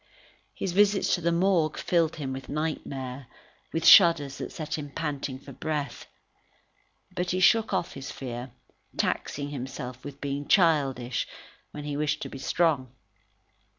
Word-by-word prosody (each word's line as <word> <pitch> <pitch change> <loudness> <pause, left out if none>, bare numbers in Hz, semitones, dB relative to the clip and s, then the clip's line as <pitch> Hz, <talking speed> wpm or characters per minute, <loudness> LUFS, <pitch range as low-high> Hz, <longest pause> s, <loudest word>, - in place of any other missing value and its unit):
His 190 - -2
visits 200 +1 +3
to 175 - +1
the 170 +1 +1
Morgue 170 -3 +2
filled 165 -3 +1
him 135 -4 -4
with 130 0 -8
nightmare, 140 -4 -4 0.4
with 165 0 -2
shudders 165 -7 +7
that - - -5
set 155 -2 -4
him 145 -1 -6
panting 140 -3 -3
for 140 +1 -12
breath. 150 -3 -4 1.1
But 180 0 -1
he 185 - 0
shook 220 +4 +4
off 190 -3 -1
his 135 0 -7
fear, 125 -1 -6 0.5
taxing 145 0 -1
himself 125 -2 -6
with 140 -1 -8
being 140 0 -3
childish, 135 - +2 0.4
when 150 - -8
he 145 -1 -3
wished 150 -1 0
to - - -6
be 135 - -8
strong. 135 -6 +1
145 Hz, 150 wpm, -27 LUFS, 135-170 Hz, 1.1 s, shudders